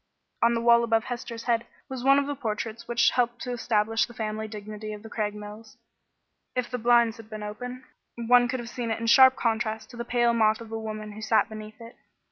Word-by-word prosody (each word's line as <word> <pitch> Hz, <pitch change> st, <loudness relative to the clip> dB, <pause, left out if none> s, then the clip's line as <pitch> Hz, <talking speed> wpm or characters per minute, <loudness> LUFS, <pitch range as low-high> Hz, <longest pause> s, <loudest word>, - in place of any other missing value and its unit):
On 235 Hz, 0 st, +4 dB
the 230 Hz, -, -1 dB
wall 235 Hz, 0 st, +5 dB
above 225 Hz, -1 st, +2 dB
Hester's 240 Hz, -2 st, -6 dB
head 235 Hz, -1 st, 0 dB, 0.2 s
was 260 Hz, -3 st, -6 dB
one 275 Hz, +1 st, +6 dB
of 285 Hz, -, +2 dB
the 290 Hz, -, -2 dB
portraits 225 Hz, -2 st, -4 dB
which 235 Hz, 0 st, +3 dB
helped 240 Hz, -1 st, 0 dB
to 250 Hz, -, -4 dB
establish 225 Hz, -2 st, +1 dB
the 240 Hz, -, -14 dB
family 220 Hz, 0 st, -3 dB
dignity 215 Hz, 0 st, -7 dB
of 210 Hz, 0 st, -9 dB
the 225 Hz, -, -11 dB
Craigmiles. 210 Hz, +1 st, -5 dB, 0.8 s
If 250 Hz, -1 st, -2 dB
the 250 Hz, -, -2 dB
blinds 235 Hz, 0 st, +4 dB
had 225 Hz, -1 st, -13 dB
been 215 Hz, -1 st, -7 dB
open, 245 Hz, +5 st, -6 dB, 0.3 s
one 245 Hz, +1 st, +4 dB
could 255 Hz, +1 st, -2 dB
have 235 Hz, -, -7 dB
seen 240 Hz, -2 st, -4 dB
it 225 Hz, -, -1 dB
in 230 Hz, -, -3 dB
sharp 260 Hz, +2 st, +7 dB
contrast 220 Hz, -1 st, -2 dB
to 240 Hz, -, -11 dB
the 235 Hz, -, -3 dB
pale 240 Hz, 0 st, +2 dB
moth 220 Hz, -1 st, +3 dB
of 230 Hz, -1 st, -10 dB
a 225 Hz, -, -3 dB
woman 215 Hz, -1 st, -6 dB
who 215 Hz, +1 st, -9 dB
sat 220 Hz, +1 st, +2 dB
beneath 215 Hz, 0 st, -9 dB
it. 230 Hz, 0 st, -12 dB
230 Hz, 225 wpm, -26 LUFS, 215-240 Hz, 0.8 s, sharp